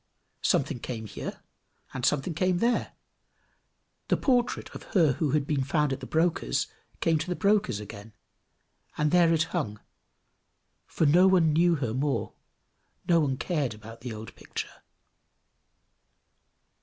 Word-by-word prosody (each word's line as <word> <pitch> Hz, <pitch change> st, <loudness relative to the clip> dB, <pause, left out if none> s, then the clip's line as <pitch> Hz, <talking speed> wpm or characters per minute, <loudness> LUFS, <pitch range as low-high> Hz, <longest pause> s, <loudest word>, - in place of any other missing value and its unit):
Something -, -, +1 dB
came 115 Hz, -2 st, -5 dB
here, 105 Hz, -, -7 dB, 0.5 s
and 130 Hz, -, -5 dB
something 150 Hz, +5 st, +1 dB
came 185 Hz, +2 st, +1 dB
there; 235 Hz, +6 st, 0 dB, 1.1 s
the -, -, +2 dB
portrait 245 Hz, -3 st, 0 dB
of -, -, -8 dB, 0.2 s
her 160 Hz, -5 st, +5 dB
who 150 Hz, +2 st, -1 dB
had 150 Hz, -2 st, +2 dB
been 140 Hz, -2 st, 0 dB
found 145 Hz, 0 st, +1 dB
at -, -, -4 dB
the -, -, -8 dB
broker's 160 Hz, -, +1 dB, 0.4 s
came 165 Hz, -1 st, +2 dB
to 155 Hz, -, -4 dB
the 180 Hz, -, -1 dB
broker's 200 Hz, -, +2 dB
again; 105 Hz, +1 st, -10 dB, 0.8 s
and 150 Hz, 0 st, +1 dB
there 175 Hz, -2 st, +5 dB
it 160 Hz, -1 st, +3 dB
hung, 110 Hz, -, -2 dB, 1.1 s
for 160 Hz, -, 0 dB
no 175 Hz, +6 st, +6 dB
one 175 Hz, -5 st, +4 dB
knew 170 Hz, +2 st, +4 dB
her 125 Hz, -7 st, -2 dB
more 135 Hz, +2 st, -1 dB, 0.7 s
no 170 Hz, -1 st, +5 dB
one 135 Hz, -4 st, 0 dB
cared 145 Hz, -, -1 dB
about 115 Hz, +2 st, -12 dB
the 125 Hz, 0 st, -5 dB
old 110 Hz, 0 st, -8 dB
picture. -, -, -7 dB
150 Hz, 145 wpm, -28 LUFS, 125-175 Hz, 1.1 s, no